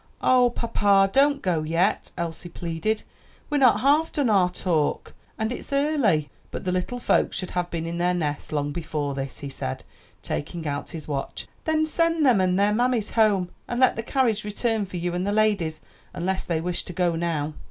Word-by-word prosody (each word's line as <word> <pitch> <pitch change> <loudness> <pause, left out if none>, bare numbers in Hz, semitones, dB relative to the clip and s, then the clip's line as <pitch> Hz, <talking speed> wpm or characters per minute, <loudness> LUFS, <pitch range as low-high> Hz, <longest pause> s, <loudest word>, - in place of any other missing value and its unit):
"Ah, 250 -1 +4
papa, 205 -4 +3
don't 280 0 +3
go 175 -4 +1
yet," 165 +5 0
Elsie 170 0 -4
pleaded, 170 +6 -2 0.5
"we're 295 - +2
not 240 -6 +5
half 295 +5 +3
done 275 -6 +1
our 185 -3 +4
talk, 170 -4 -1 0.2
and 220 +1 -1
it's 250 - -6
early." 275 - +2 0.2
"But - - -6
the 180 - +1
little 185 +7 -2
folks - - +1
should 185 - -4
have 180 0 -1
been 165 -1 -3
in 170 +1 -4
their 180 +1 +2
nests 150 -4 -3
long 145 -1 -1
before 150 -3 -3
this," 135 -1 -5
he 140 - -5
said, 65 - -4 0.4
taking 165 +2 -4
out 145 0 -3
his 160 -3 -7
watch. 140 -2 -4 0.2
"Then 315 0 +2
send 330 0 +2
them 240 -7 +5
and 185 0 +2
their 205 +1 +3
mammies 240 -1 +1
home, 205 -5 +3 0.2
and 240 - -2
let 260 -1 +5
the 230 - -2
carriage 230 -3 +1
return 210 0 -1
for 185 - -6
you 175 0 -2
and 180 +2 -1
the - - +1
ladies; 205 -7 +1 0.3
unless 185 +2 -1
they 165 -2 -1
wish 175 +1 -2
to 180 - -7
go 175 -1 +1
now." 160 -3 -1
185 Hz, 195 wpm, -25 LUFS, 165-235 Hz, 0.5 s, not